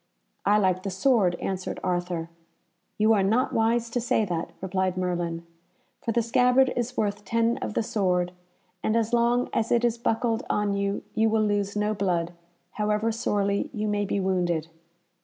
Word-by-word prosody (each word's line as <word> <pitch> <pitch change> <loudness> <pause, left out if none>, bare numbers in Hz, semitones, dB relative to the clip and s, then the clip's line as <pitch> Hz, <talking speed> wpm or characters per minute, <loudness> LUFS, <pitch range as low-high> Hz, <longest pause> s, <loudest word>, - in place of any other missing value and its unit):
"I 205 +1 +5
like 185 -3 +2
the 195 - -3
sword," 190 -2 +2
answered 185 +1 -4
Arthur. 175 -2 -2 0.7
"You 215 +1 +4
are 205 - +3
not 225 +7 +1
wise 230 +1 +2
to 245 - -1
say 225 -2 +1
that," 170 -3 -3
replied 190 -1 -1
Merlin, 175 -2 -2 0.6
"for 230 - 0
the 235 +1 +1
scabbard 250 +3 +3
is 245 +1 -3
worth 205 -1 -1
ten 230 +3 +1
of - - -4
the - - +1
sword, 180 -4 0 0.5
and 215 - 0
as 230 0 0
long 240 +1 +3
as 225 0 0
it 240 0 +3
is 235 0 0
buckled 225 0 0
on 210 -1 +1
you 200 0 -1
you 220 0 +2
will 220 0 +2
lose 205 -1 0
no 210 +1 +1
blood, 175 -4 -1 0.4
however 210 +2 0
sorely 200 -3 0
you 215 0 -2
may 205 -1 0
be 200 - -1
wounded." 175 -4 0
210 Hz, 175 wpm, -26 LUFS, 185-230 Hz, 0.7 s, I